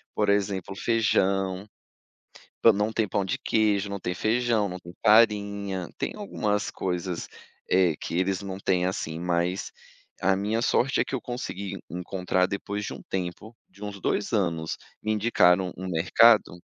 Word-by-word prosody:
Por 105 -1 +1
exemplo 100 -2 0
feijão, 95 -3 +1 1.0
pã 115 - +8
não 105 +2 0
tem 110 -1 0
pão 100 - 0
de 95 - -1
queijo, 105 -2 +1
não 100 -1 -4
tem 90 0 -3
feijão, 115 0 +1
não 90 -1 -5
tem 85 0 -12
farinha. 100 -4 +3
Tem - - -2
algumas 105 - -1
coisas, 90 -1 -3 0.4
eh, 90 -3 +4
que - - -4
eles 95 0 0
não 95 -2 -5
têm, 90 -2 +1
assim, 80 -3 -3
mas 90 +2 -1 0.5
a 95 +1 +4
minha 105 +4 -1
sorte 135 +2 +2
é - - +3
que - - -6
eu 130 - -1
consegui 100 -6 -5
encontrar 90 +1 0
depois 100 +1 -4
de - - -5
um - - -10
tempo, 95 +4 -4
de 100 +3 -11
uns 100 -1 -6
2 105 - -1
anos, 85 -7 -1 0.2
me 110 - 0
indicaram 95 -5 +3
um 95 - -6
mercado 90 +3 +4
100 Hz, 160 wpm, -26 LUFS, 90-105 Hz, 1.0 s, pã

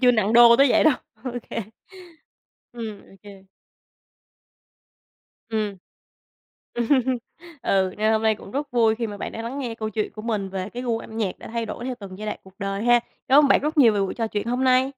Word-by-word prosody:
chưa 250 -1 +6
nặng 215 -2 +1
đô 235 0 +8
tới 275 +1 +5
vậy - - +4
đâu. 310 - +6 0.3
OK. 245 -3 -5 1.1
Ừm, 225 -4 -6
OK. 195 0 -15 2.0
Ừm. 215 -3 -2 1.0
Ừm, 235 -1 -1 0.7
ừ, 190 -1 +2
nên 215 +1 +2
hôm 220 - +1
nay 220 -1 +3
cũng 200 - -12
rất 285 +4 -3
vui 225 -2 +3
khi 230 0 -3
mà 205 - -7
bạn - - -5
đã 225 - -6
lắng 245 +4 -5
nghe 245 -5 -4
câu 220 -1 -4
chuyện 215 +1 -2
của 215 - -9
mình 215 -4 -2
về 190 0 -4
cái 245 - -6
gu 235 -3 -1
âm 220 - -10
nhạc 200 -5 -2
đã - - -10
thay 230 0 -3
đổi 225 +3 -6
theo 255 - -3
từng 195 -1 -9
giai 215 - -6
đoạn 210 - -3
cuộc 190 0 -17
đời 200 0 -3
ha. 240 0 +5 0.3
Cám 270 - +7
ơn 285 - +3
bạn - - +5
rất 305 +2 -2
nhiều 235 -6 +7
về 205 - +1
buổi 195 -1 -1
trò 225 -1 -1
chuyện 210 0 -3
hôm 245 +2 0
nay. 260 +1 +3
225 Hz, 215 wpm, -24 LUFS, 205-245 Hz, 2.0 s, đô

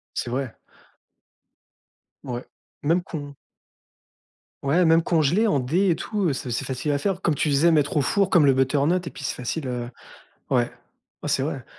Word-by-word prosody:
C'est 120 - -3
vrai. 130 -1 -3 1.7
Ouais, 125 -1 -5 0.4
même 165 +4 +2
con 145 -5 -7 1.3
ouais 160 +6 +3
même 165 0 +5
congelés 170 +6 +2
en 145 -10 +2
dés 175 +9 +2
et 165 - +2
tout, 210 +4 -3
heu, - - +1
c'est 130 -1 -5
c'est 115 - -2
facile 130 +3 -3
à 145 - +1
faire. 190 +2 -2
Comme 160 -4 +1
tu 150 - 0
disais 145 +4 +4
mettre 155 +2 +2
au - - +4
four 195 +7 +2
comme 170 -5 +5
le 140 - +6
butternut 145 +7 +1
et - - -4
puis - - -11
c'est 135 - -2
facile, 130 +3 -3
heu, 120 -1 -3 0.6
ouais, - - +3 0.6
ouais - - -2
c'est - - +1
vrai. - - -3
150 Hz, 185 wpm, -24 LUFS, 135-175 Hz, 1.7 s, le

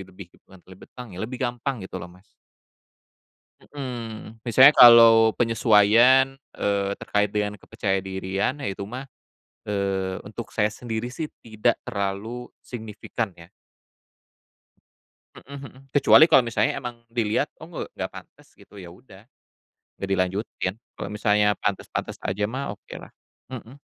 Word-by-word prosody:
bebih 95 -1 -13
bukan 95 -1 -18
lebih 95 - -14
tang 125 -5 -9
ya, 90 - -7
lebih 125 +4 -5
gampang 120 -2 -3
gitu 95 0 -7
loh, 85 - -8
Mas. 90 +2 -19 1.4
Mhm. 115 -5 -8
Misalnya 130 +5 +7
kalau 115 -2 +8
penyesuaian, 115 +4 +4 0.2
eee, 100 -1 0
terkait 105 0 0
dengan 105 -1 -2
kepercayadirian, 95 +4 -3
ya 140 - -4
itu 100 0 -4
mah, 125 +7 -7 0.6
eee, 95 -2 -1
untuk 105 +1 -8
saya 105 0 0
sendiri 120 +2 -5
sih 160 -2 -5 0.2
tidak 110 -2 0
terlalu 100 +5 -4 0.2
signifikan 110 -2 -5
ya. 85 0 -14 1.9
Mhm 140 +1 -11
mhm. - - -16 0.2
Kecuali 145 +2 +7
kalau 130 - +7
misalnya 110 +1 0
emang 120 -3 -8
dilihat, 115 -3 0
"Oh - - -10
ng - - -15 0.2
nggak - - -5
pantes," - - -15
gitu, 105 - -16
ya 90 - -10
udah. 95 +4 -16 0.7
Nggak 100 - -4
dilanjutin, 95 0 -2 0.2
kalau - - -6
misalnya 105 -1 +2
pantes-pantes 100 - -3
aja 105 +2 -1
mah 130 -2 -4
okelah, 105 - -12 0.4
mhm. 125 +2 -9
110 Hz, 135 wpm, -24 LUFS, 100-120 Hz, 1.9 s, kalau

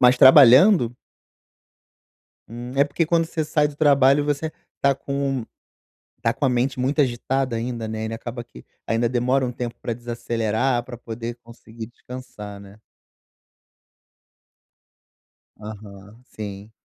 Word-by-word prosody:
mas 125 0 +6
trabalhando? 130 - +7 1.6
Hum, 120 +2 -7
é 140 - +5
porque 150 +3 -1
quando 165 0 +2
você 160 -2 -3
sai 150 -1 +2
do 145 - -10
trabalho, 140 -1 +4
você 150 +2 -2 0.3
tá 140 -1 +3
com 140 -3 -3 0.8
tá 115 - +2
com 140 - -4
a 135 - +4
mente 125 +2 0
muito 140 +4 +1
agitada 130 0 0
ainda, 115 -1 -4
né. 110 0 -4
Ele 110 - -4
acaba 120 +1 -6
que - - -15 0.2
ainda 115 +1 +1
demora 125 +2 +1
um 125 - -4
tempo 120 -1 -5
pra 120 - -3
desacelerar, 120 +1 -1
pra 120 -2 -9
poder 115 0 -6
conseguir 115 -1 -11
descansar, 120 -4 -10
né. 100 +1 -14 2.8
Aham, 105 +1 -11
sim. 105 0 -8
120 Hz, 130 wpm, -23 LUFS, 115-135 Hz, 2.8 s, trabalhando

